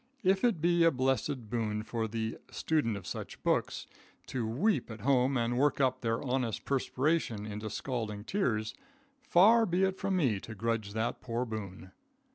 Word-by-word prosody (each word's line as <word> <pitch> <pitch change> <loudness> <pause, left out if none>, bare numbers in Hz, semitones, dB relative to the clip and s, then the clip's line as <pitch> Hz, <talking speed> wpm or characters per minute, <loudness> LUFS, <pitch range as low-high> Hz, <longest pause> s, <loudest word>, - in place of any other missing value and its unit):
If 190 0 +3
it 230 -10 +2
be 170 0 +4
a 165 - +7
blessed 130 -3 -1
boon 110 -3 -1
for 110 0 -2
the 110 0 -3
student 145 -10 0
of 100 - -10
such - - -7
books - - 0 0.4
to 120 -4 -3
weep 140 - +1
at 110 -2 -8
home 130 +1 +3
and 120 +1 0
work 145 0 +2
up 130 -1 +2
their 115 -1 -1
honest 125 -4 -1
perspiration 135 -4 0
into 105 +1 -5
scalding 110 -4 -4
tears, 110 - -1 0.5
far 225 +4 +6
be 180 +2 +1
it 190 0 0
from 195 0 0
me 125 - +2
to 110 +3 -9
grudge 110 -1 -2
that 110 +1 -2
poor 120 +1 -2
boon. 100 -5 -7
120 Hz, 170 wpm, -31 LUFS, 110-150 Hz, 0.5 s, a